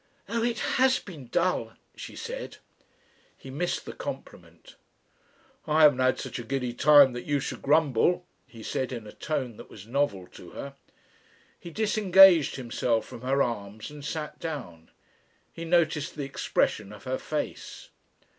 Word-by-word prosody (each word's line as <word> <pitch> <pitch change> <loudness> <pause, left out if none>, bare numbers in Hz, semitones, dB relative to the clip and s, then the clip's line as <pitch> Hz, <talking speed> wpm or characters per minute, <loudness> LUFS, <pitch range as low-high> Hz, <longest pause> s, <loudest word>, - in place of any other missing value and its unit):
"Oh! 230 0 -1
it 235 0 0 0.2
has 260 0 +5
been 155 -10 -10
dull," 180 +9 0 0.2
she - - -9
said. - - -6 0.8
He 135 - -11
missed 175 +6 -2
the - - -7
compliment. - - -9 0.9
"I 155 +1 +4
haven't 145 -4 +6
had 130 0 +2
such - - -5
a - - -5
giddy 125 0 -2
time 145 0 +6
that 120 - -6
you 145 -1 +1
should - - -5
grumble," 155 +4 +2 0.2
he 115 -2 -12
said, 130 +3 -2
in 120 -4 -6
a 105 - -9
tone 130 -7 -3
that - - -12
was 100 - -12
novel 115 -7 -1
to 85 - -13
her. 140 0 -7 0.9
He 170 - -9
disengaged 195 -4 +5
himself 120 -2 -1
from - - -10
her 135 +2 +2
arms 110 0 -5
and 150 -1 -10
sat 150 +1 -5
down. 120 - -7 0.6
He 165 - -7
noticed 160 -3 +1
the 150 - -4
expression 105 -6 -1
of 105 - -12
her 130 0 -2
face. 155 -1 -5
140 Hz, 155 wpm, -27 LUFS, 120-165 Hz, 0.9 s, haven't